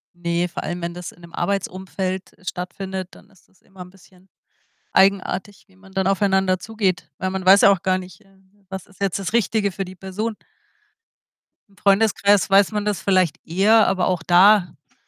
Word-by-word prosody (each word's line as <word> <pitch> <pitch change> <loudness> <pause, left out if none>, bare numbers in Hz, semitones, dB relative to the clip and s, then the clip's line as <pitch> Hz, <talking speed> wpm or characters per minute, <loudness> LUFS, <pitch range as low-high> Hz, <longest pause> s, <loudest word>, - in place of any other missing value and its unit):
Ne, 175 0 -1
vor 175 - -7
allem, 175 +1 -4
wenn 170 0 -4
das 180 0 -8
in 175 - -21
'nem 170 0 -14
Arbeitsumfeld 190 0 -3
stattfindet, 185 +1 -6
dann - - -18
ist 190 -3 -26
das 190 - -32
immer 190 -1 -15
'n 180 - -9
bisschen 185 0 -22 0.6
eigenartig, 195 0 +1
wie 190 - -26
man 190 0 -19
dann 190 -1 0
aufeinander 190 -1 +1
zugeht. 200 -6 -2
Weil 185 - -2
man 190 -1 -4
weiß 195 +2 +7
ja 200 - +7
auch 195 - 0
gar 185 0 +1
nicht, 185 +1 -11
äh, - - -25
äh, 195 +1 -29
was 190 -1 -7
ist 195 - -22
jetzt 195 -1 -1
das 195 +2 -5
Richtige 215 -3 +1
für 195 +2 -5
die 185 +1 -11
Person? 200 +5 -4 1.3
Im 200 - -27
Freundeskreis 205 0 +3
weiß 195 +1 +4
man 210 -1 -2
das 210 -2 -1
vielleicht 185 -4 +1
eher, 205 +6 +4
aber 185 -2 +1
auch 180 -3 -1
da, 180 0 +5 0.2
äh, - - -32
190 Hz, 195 wpm, -21 LUFS, 180-200 Hz, 1.3 s, weiß